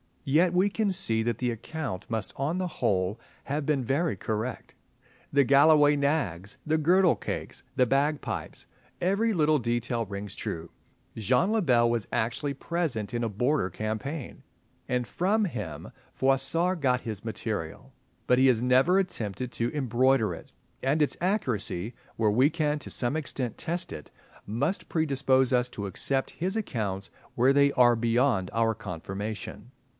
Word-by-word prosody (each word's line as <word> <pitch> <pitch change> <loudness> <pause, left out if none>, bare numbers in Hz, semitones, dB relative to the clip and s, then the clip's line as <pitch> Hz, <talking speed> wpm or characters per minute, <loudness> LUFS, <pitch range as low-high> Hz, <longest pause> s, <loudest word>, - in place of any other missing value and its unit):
Yet 165 +6 +3
we 185 +3 +3
can 210 0 0
see 115 -12 +1
that 115 -1 -1
the 125 -1 0
account 120 - -5
must 110 -5 -2
on 150 +6 -1
the 185 - -1
whole 100 - -1 0.3
have 145 +1 -2
been 140 -3 +1
very 140 +2 0
correct. 110 +5 -4 0.6
The 140 0 +5
Galloway 145 +2 +6
nags, 135 - -1
the 155 +1 +2
girdle 175 +3 +4
cakes, - - -5
the 125 - +4
bagpipes—every 155 - -1
little 155 -4 +3
detail 120 -1 -1
rings 100 0 -6
true. 85 0 -5 0.4
Jean 125 - +2
le 225 -1 +2
Bel 120 -8 +4
was 115 -3 -1
actually 120 +5 -1
present 135 - -2
in 120 0 -1
a 115 - 0
Border 120 +1 0
campaign, 110 - -5 0.4
and 125 -1 0
from 205 - +1
him 105 - -6 0.2
Froissart 150 +7 +1
got 125 -2 +2
his 110 -3 -6
material; 110 +1 -4 0.3
but 125 - +3
he 135 - +6
has 120 -3 +3
never 130 +9 +4
attempted 125 - -2
to 115 +1 -1
embroider 130 -5 +2
it, 80 - -11 0.3
and 140 +4 +1
its 150 - +1
accuracy, 120 - -1 0.2
where 110 -2 +2
we 130 +7 +4
can 150 -2 0
to - - -7
some 125 +4 -1
extent 135 -6 -3
test 175 +2 -3
it, 75 - -8 0.4
must 140 - -1
predispose 135 -4 +2
us 125 -1 +2
to 100 -4 -5
accept 135 +7 -1
his 185 +5 -3
accounts 105 - -3 0.3
where 130 +3 +4
they 140 0 +4
are 120 -2 +5
beyond 115 -3 +1
our 115 0 +2
confirmation. 105 +3 -6
130 Hz, 150 wpm, -28 LUFS, 110-150 Hz, 0.6 s, Galloway